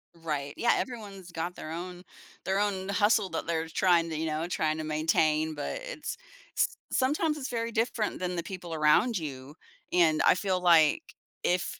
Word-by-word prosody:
Right, 150 Hz, -4 st, -4 dB
yeah, 235 Hz, -, +3 dB
everyone's 200 Hz, -7 st, -5 dB
got 170 Hz, +2 st, -4 dB
their 155 Hz, -, -7 dB
own 180 Hz, +2 st, -6 dB, 0.4 s
their 190 Hz, +1 st, 0 dB
own 195 Hz, -2 st, -1 dB
hustle 205 Hz, 0 st, +3 dB
that 165 Hz, -, -4 dB
they're 165 Hz, -1 st, -1 dB
trying 170 Hz, -1 st, +3 dB
to, 160 Hz, -, -3 dB
you 160 Hz, -, -1 dB
know, 155 Hz, +1 st, -1 dB
trying 155 Hz, -3 st, 0 dB
to 155 Hz, -, -3 dB
maintain, 155 Hz, 0 st, +1 dB
but 145 Hz, -, -4 dB
it's -, -, -6 dB, 0.4 s
s -, -, +4 dB, 0.2 s
sometimes 300 Hz, +4 st, +1 dB
it's 270 Hz, -, -4 dB
very 230 Hz, -1 st, -2 dB
different 225 Hz, -1 st, -1 dB
than 180 Hz, 0 st, -2 dB
the 170 Hz, -, -2 dB
people 180 Hz, -4 st, -7 dB
around 160 Hz, +9 st, +3 dB
you, 140 Hz, -3 st, -7 dB, 0.4 s
and 165 Hz, -3 st, +4 dB
I -, -, +6 dB
feel 185 Hz, -1 st, 0 dB
like 165 Hz, -, +5 dB, 0.4 s
if 180 Hz, 0 st, 0 dB
175 Hz, 180 wpm, -29 LUFS, 160-205 Hz, 0.4 s, I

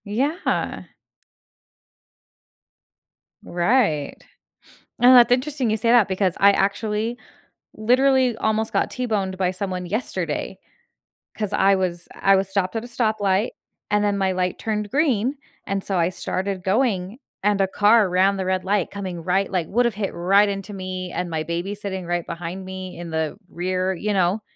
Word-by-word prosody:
Yeah. 275 Hz, -, -1 dB, 2.6 s
Right. 175 Hz, -, +1 dB, 0.9 s
And 250 Hz, +1 st, +8 dB
that's 240 Hz, -1 st, +7 dB
interesting 260 Hz, 0 st, +1 dB
you 215 Hz, -, +1 dB
say 230 Hz, +2 st, 0 dB
that 235 Hz, -4 st, +5 dB
because 190 Hz, -1 st, 0 dB
I 200 Hz, +1 st, +7 dB
actually 210 Hz, +4 st, -1 dB, 0.6 s
literally 255 Hz, +2 st, +3 dB
almost 220 Hz, 0 st, 0 dB
got -, -, +1 dB
t-boned 210 Hz, -7 st, -2 dB
by 185 Hz, -1 st, +1 dB
someone 185 Hz, -1 st, -4 dB
yesterday 215 Hz, +8 st, -3 dB, 0.8 s
'cause 210 Hz, -2 st, -3 dB
I 195 Hz, +1 st, +4 dB
was 180 Hz, -2 st, -2 dB
I 195 Hz, 0 st, +3 dB
was 190 Hz, 0 st, 0 dB
stopped 195 Hz, 0 st, -1 dB
at 225 Hz, -, -2 dB
a -, -, -8 dB
stoplight, 215 Hz, -3 st, 0 dB, 0.4 s
and 210 Hz, 0 st, +2 dB
then 205 Hz, -1 st, +1 dB
my 190 Hz, -1 st, +1 dB
light 180 Hz, -1 st, -1 dB
turned 210 Hz, -1 st, -2 dB
green, 270 Hz, -2 st, +1 dB, 0.3 s
and 195 Hz, -1 st, -2 dB
so 195 Hz, -, -2 dB
I 170 Hz, 0 st, +2 dB
started 185 Hz, +1 st, -3 dB
going, 200 Hz, 0 st, 0 dB, 0.2 s
and 205 Hz, -1 st, +2 dB
a 195 Hz, -, +3 dB
car 210 Hz, +1 st, +4 dB
ran 190 Hz, +2 st, +3 dB
the 190 Hz, -, -2 dB
red 185 Hz, 0 st, 0 dB
light 195 Hz, -2 st, +1 dB
coming 185 Hz, -4 st, -6 dB
right 190 Hz, +3 st, 0 dB
like, 180 Hz, -4 st, -1 dB
would 245 Hz, +4 st, +2 dB
have 235 Hz, -, +1 dB
hit 200 Hz, -2 st, -3 dB
right 195 Hz, +4 st, +3 dB
into 200 Hz, +1 st, -5 dB
me 185 Hz, -1 st, -5 dB
and 180 Hz, -, -3 dB
my 160 Hz, -1 st, -2 dB
baby 170 Hz, +5 st, -3 dB
sitting 195 Hz, -3 st, -5 dB
right 175 Hz, 0 st, -2 dB
behind 175 Hz, +3 st, -6 dB
me 185 Hz, -1 st, -7 dB
in 170 Hz, -1 st, -7 dB
the 160 Hz, 0 st, -2 dB
rear. 185 Hz, +2 st, -1 dB
You 210 Hz, +4 st, -2 dB
know? 190 Hz, +2 st, +1 dB
195 Hz, 160 wpm, -22 LUFS, 185-220 Hz, 2.6 s, And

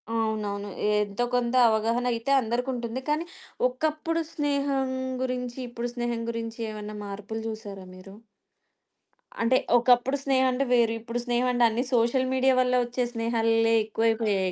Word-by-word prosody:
అవునవును. 215 Hz, -3 st, -2 dB, 0.3 s
ఎంతో 205 Hz, +3 st, -2 dB
కొంత 245 Hz, 0 st, 0 dB
అవగాహన 225 Hz, +3 st, +1 dB
అయితే 230 Hz, +4 st, -2 dB
అందరికుంటుంది. 240 Hz, +1 st, -2 dB
కానీ, 305 Hz, +3 st, 0 dB, 0.4 s
ఒకప్పుడు 310 Hz, +5 st, -1 dB
స్నేహం 280 Hz, -3 st, 0 dB, 0.3 s
గురించి, 250 Hz, -1 st, -3 dB
ఇప్పుడు 240 Hz, 0 st, -4 dB
స్నేహం 240 Hz, -1 st, -2 dB
గురించి, 230 Hz, 0 st, -5 dB
ఏమన్నా 210 Hz, 0 st, -7 dB
మార్పులు 205 Hz, +2 st, -6 dB
జూసారా 205 Hz, -4 st, -7 dB
మీరు? 195 Hz, +1 st, -12 dB, 1.3 s
అంటే, 240 Hz, +3 st, +4 dB, 0.2 s
ఒకప్పుడు 245 Hz, +3 st, +3 dB
స్నేహం 260 Hz, -1 st, +3 dB
అంటే 260 Hz, +2 st, 0 dB
వేరు, 235 Hz, -2 st, +4 dB
ఇప్పుడు 230 Hz, +2 st, -4 dB
స్నేహం 245 Hz, 0 st, +1 dB
అంటే 245 Hz, -1 st, +2 dB
అన్ని 230 Hz, +3 st, -1 dB
సోషల్ 240 Hz, +2 st, +3 dB
మీడియా 260 Hz, 0 st, +3 dB
వల్ల 250 Hz, 0 st, +1 dB
ఒచ్చే 245 Hz, +1 st, -2 dB
స్నేహాలే 230 Hz, -1 st, +2 dB
ఎక్కువైపోయాయి 215 Hz, -3 st, 0 dB
235 Hz, 130 wpm, -26 LUFS, 225-255 Hz, 1.3 s, అంటే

